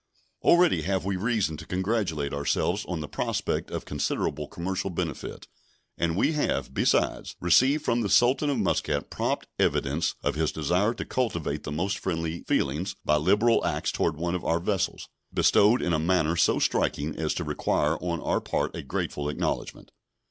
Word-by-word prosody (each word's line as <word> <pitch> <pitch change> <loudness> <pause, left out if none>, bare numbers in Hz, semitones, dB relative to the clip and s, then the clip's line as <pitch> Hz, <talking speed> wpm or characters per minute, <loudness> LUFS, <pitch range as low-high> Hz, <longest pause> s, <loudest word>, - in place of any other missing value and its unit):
Already 175 0 +4
have 95 -1 -1
we 100 0 0
reason 100 -6 0
to 80 - -9
congratulate 90 -7 -1
ourselves 85 +7 0
on 85 -4 -3
the 75 - -5
prospect - - -2
of - - -5
considerable - - -2
commercial 95 +3 -3
benefit; 85 -5 -5 0.5
and 85 0 -1
we 150 - +3
have, 150 -2 -1
besides, - - +1
received 130 - +4
from 120 0 +2
the 105 - -1
Sultan 130 +7 +4
of 140 - 0
Muscat 70 -1 0
prompt - - -1
evidence 75 +5 +1
of - - +1
his 80 0 0
desire 90 - +1
to - - -5
cultivate 85 - -2
the 75 - -4
most 95 +6 -1
friendly 85 -2 -3
feelings, 90 +9 0
by 75 - +4
liberal 105 +9 +3
acts - - -1
toward 80 -2 0
one 85 +2 -2
of 90 - -2
our 85 +1 +1
vessels, 95 +2 -1 0.2
bestowed 105 +5 +4
in 85 - 0
a 80 - +2
manner 85 -1 +2
so 85 - +3
striking 75 +1 0
as - - -1
to - - -2
require - - 0
on 85 -2 -2
our - - 0
part - - -2
a - - -4
grateful 75 0 -3
acknowledgment. 75 - -3
90 Hz, 170 wpm, -27 LUFS, 80-105 Hz, 0.5 s, Already